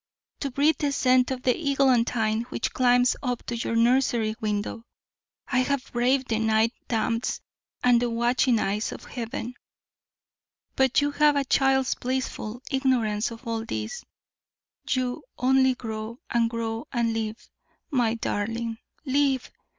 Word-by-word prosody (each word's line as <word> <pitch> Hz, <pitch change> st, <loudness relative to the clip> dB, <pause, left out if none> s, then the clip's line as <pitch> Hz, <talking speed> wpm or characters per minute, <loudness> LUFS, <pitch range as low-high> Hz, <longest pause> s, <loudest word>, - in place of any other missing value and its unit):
To 280 Hz, -, -2 dB
breathe 285 Hz, +5 st, +2 dB
the 290 Hz, -2 st, 0 dB
scent 255 Hz, -2 st, +3 dB
of 255 Hz, -1 st, -4 dB
the 250 Hz, -, +3 dB
eglantine 245 Hz, -6 st, +2 dB
which -, -, -3 dB
climbs 245 Hz, 0 st, +4 dB
up 250 Hz, -3 st, -3 dB
to 240 Hz, -, -3 dB
your 230 Hz, 0 st, -2 dB
nursery 235 Hz, -2 st, +2 dB
window, 210 Hz, +1 st, -2 dB, 0.6 s
I 250 Hz, -, +1 dB
have 265 Hz, +1 st, -1 dB
braved 255 Hz, +2 st, +1 dB
the 220 Hz, -1 st, +1 dB
night 220 Hz, +1 st, +2 dB
damps 230 Hz, 0 st, -1 dB, 0.4 s
and 245 Hz, -1 st, +5 dB
the 245 Hz, -, +1 dB
watching 240 Hz, +1 st, +2 dB
eyes 210 Hz, +1 st, -1 dB
of -, -, -8 dB
Heaven; 235 Hz, 0 st, -5 dB, 1.2 s
but 265 Hz, +1 st, +3 dB
you 290 Hz, 0 st, +1 dB
have 295 Hz, 0 st, +4 dB
a 280 Hz, -1 st, +1 dB
child's 265 Hz, 0 st, +3 dB
blissful 250 Hz, -2 st, -4 dB
ignorance 245 Hz, -6 st, +1 dB
of 230 Hz, +2 st, -11 dB
all 225 Hz, -1 st, -2 dB
this; 485 Hz, -, -5 dB, 0.9 s
you 255 Hz, -2 st, 0 dB, 0.2 s
only 260 Hz, 0 st, +3 dB
grow 220 Hz, -1 st, -6 dB
and 230 Hz, -1 st, +2 dB
grow 230 Hz, +3 st, -4 dB
and 235 Hz, -3 st, 0 dB
live, 220 Hz, 0 st, -3 dB, 0.5 s
my 240 Hz, -5 st, +2 dB
darling, 225 Hz, +1 st, -3 dB, 0.3 s
LIVE! 270 Hz, -1 st, +1 dB
245 Hz, 140 wpm, -26 LUFS, 225-265 Hz, 1.2 s, and